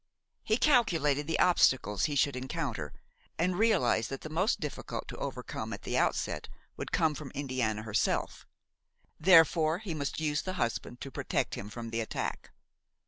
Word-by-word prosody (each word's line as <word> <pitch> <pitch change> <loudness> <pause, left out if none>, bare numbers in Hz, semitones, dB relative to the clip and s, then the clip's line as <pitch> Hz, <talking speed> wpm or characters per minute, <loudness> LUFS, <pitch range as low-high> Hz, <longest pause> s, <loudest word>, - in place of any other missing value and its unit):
He 220 - +2
calculated 165 - +3
the 165 - 0
obstacles 130 - +3
he 145 - -1
should 140 -1 +2
encounter, 125 - -3 0.5
and 180 +2 +1
realized 185 - +3
that 135 - -5
the 155 - -8
most 185 +8 +1
difficult - - -5
to - - -6
overcome - - -5
at - - -8
the - - -3
outset - - 0 0.3
would - - -6
come 160 -2 +2
from 145 -1 -7
Indiana 130 -6 -1
herself; 110 -1 -1 0.7
therefore 165 -1 +5
he 195 -4 -5
must 145 -1 -3
use 150 -1 0
the 185 - -4
husband 120 -5 -3
to 135 - -6
protect - - -1
him 100 - -5
from 115 +1 -7
the 115 0 -1
attack. 110 - -4
145 Hz, 160 wpm, -30 LUFS, 120-170 Hz, 0.7 s, therefore